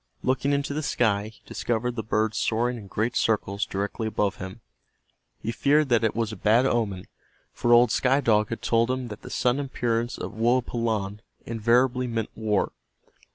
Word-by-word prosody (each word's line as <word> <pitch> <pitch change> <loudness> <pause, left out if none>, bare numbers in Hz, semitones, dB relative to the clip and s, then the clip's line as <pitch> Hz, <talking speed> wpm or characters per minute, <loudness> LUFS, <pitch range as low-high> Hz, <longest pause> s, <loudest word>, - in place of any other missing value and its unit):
Looking 130 +2 +1
into 140 0 0
the 155 - -2
sky 110 -8 +1
he 110 - -15
discovered 120 +1 -2
the 115 - -2
bird 110 0 0
soaring 120 +3 0
in 105 -4 -9
great 110 +5 -1
circles 100 -2 0
directly 100 +3 -3
above 105 -2 0
him. 95 -3 -8 0.8
He 115 - -1
feared 145 +3 +2
that 120 -2 +3
it 110 - +1
was 115 -1 -1
a - - -6
bad 110 +6 +3
omen, 105 -8 0 0.5
for 120 - 0
old 120 -1 +6
Sky 130 +3 +3
Dog 110 -5 +2
had 115 - -5
told 115 +1 +2
him 130 -1 -2
that 105 0 -8
the - - -9
sudden 125 +3 +1
appearance 120 -2 -1
of - - -5
Woapalanne 115 -3 0 0.3
invariably 120 +3 +2
meant 115 -2 -3
war. 105 -2 0
115 Hz, 175 wpm, -26 LUFS, 110-125 Hz, 0.8 s, old